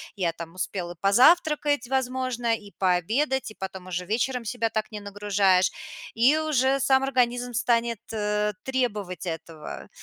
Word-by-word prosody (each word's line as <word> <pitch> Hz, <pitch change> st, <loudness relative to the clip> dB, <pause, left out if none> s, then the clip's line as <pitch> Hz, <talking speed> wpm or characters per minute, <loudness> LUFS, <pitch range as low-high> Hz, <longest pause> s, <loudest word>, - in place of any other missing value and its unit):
я 175 Hz, -4 st, 0 dB
там 165 Hz, 0 st, -9 dB
успел 185 Hz, -1 st, -4 dB
и 175 Hz, -, -9 dB
позавтракать, 290 Hz, -, +4 dB
возможно, 255 Hz, -2 st, 0 dB
и 205 Hz, -2 st, -12 dB
пообедать, 220 Hz, -, +1 dB
и -, -, -14 dB
потом 190 Hz, -1 st, -7 dB
уже 180 Hz, 0 st, -3 dB
вечером 235 Hz, +4 st, -1 dB
себя 230 Hz, 0 st, -1 dB
так 220 Hz, 0 st, -3 dB
не 210 Hz, -, -5 dB
нагружаешь. 200 Hz, -2 st, +2 dB, 0.4 s
И 255 Hz, +7 st, +4 dB
уже 275 Hz, -3 st, +2 dB
сам 265 Hz, 0 st, +3 dB
организм 245 Hz, -2 st, 0 dB
станет, 235 Hz, -2 st, +1 dB
э, 210 Hz, -1 st, 0 dB
требовать 215 Hz, -9 st, -2 dB
этого. 165 Hz, -2 st, -7 dB
225 Hz, 145 wpm, -26 LUFS, 195-255 Hz, 0.4 s, позавтракать